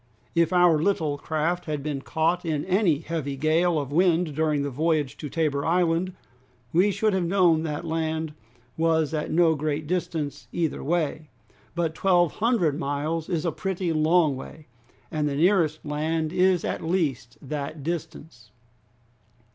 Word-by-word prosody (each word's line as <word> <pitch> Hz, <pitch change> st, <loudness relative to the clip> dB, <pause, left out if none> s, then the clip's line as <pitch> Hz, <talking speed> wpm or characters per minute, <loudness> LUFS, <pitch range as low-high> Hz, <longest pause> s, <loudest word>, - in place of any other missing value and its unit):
If 170 Hz, +1 st, +2 dB
our 175 Hz, -4 st, +4 dB
little 160 Hz, -6 st, 0 dB
craft 160 Hz, +4 st, -1 dB
had 150 Hz, -3 st, -3 dB
been 145 Hz, -2 st, -3 dB
caught 165 Hz, +4 st, 0 dB
in 155 Hz, -4 st, -2 dB
any 185 Hz, -5 st, +2 dB
heavy 155 Hz, -4 st, -4 dB
gale 160 Hz, +4 st, +2 dB
of 140 Hz, -1 st, -5 dB
wind 170 Hz, -1 st, +2 dB
during 155 Hz, -2 st, +1 dB
the 140 Hz, -, -3 dB
voyage 150 Hz, -1 st, 0 dB
to 150 Hz, -, -6 dB
Tabor 150 Hz, -3 st, 0 dB
Island, 175 Hz, +1 st, +1 dB, 0.6 s
we 180 Hz, +5 st, +4 dB
should 215 Hz, +1 st, +1 dB
have 185 Hz, -2 st, +1 dB
known 175 Hz, -4 st, +3 dB
that 155 Hz, 0 st, -4 dB
land 160 Hz, -1 st, -2 dB, 0.4 s
was 160 Hz, -1 st, +1 dB
at 150 Hz, -1 st, -2 dB
no 165 Hz, -1 st, +4 dB
great 150 Hz, 0 st, -2 dB
distance 150 Hz, -6 st, -3 dB
either 165 Hz, -4 st, -2 dB
way; 155 Hz, -1 st, -1 dB, 0.5 s
but 170 Hz, -2 st, 0 dB
twelve 175 Hz, -1 st, +3 dB
hundred 205 Hz, -, +1 dB
miles 155 Hz, +2 st, -2 dB
is 170 Hz, -1 st, -1 dB
a 170 Hz, -, +1 dB
pretty 185 Hz, -1 st, -2 dB
long 155 Hz, -1 st, +3 dB
way, 150 Hz, +3 st, -10 dB, 0.5 s
and 150 Hz, -3 st, 0 dB
the 140 Hz, -, -3 dB
nearest 160 Hz, -2 st, +2 dB
land 155 Hz, +2 st, -1 dB
is 185 Hz, -1 st, +3 dB
at -, -, -2 dB
least 150 Hz, -, -1 dB
that 145 Hz, +1 st, -5 dB
distance!" 165 Hz, -1 st, -6 dB
160 Hz, 155 wpm, -25 LUFS, 150-175 Hz, 0.6 s, our